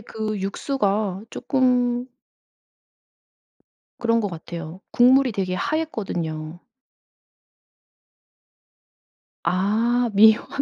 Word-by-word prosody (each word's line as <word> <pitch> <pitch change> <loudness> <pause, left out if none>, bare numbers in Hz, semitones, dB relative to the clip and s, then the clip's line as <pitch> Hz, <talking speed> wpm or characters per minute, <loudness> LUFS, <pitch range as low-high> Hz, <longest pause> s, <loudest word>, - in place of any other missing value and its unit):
그 215 -1 -4
육수가 200 -2 -1
쪼끔 250 -2 +1 1.9
그런 230 -1 +1
것 205 -3 -2
같아요. 170 0 -8
국물이 255 +1 +5
되게 185 -2 -2
하앴거든요. 175 - -3 2.8
아 220 +7 +1
미원을. 220 +2 +5
215 Hz, 145 characters per minute, -23 LUFS, 185-245 Hz, 2.8 s, 국물이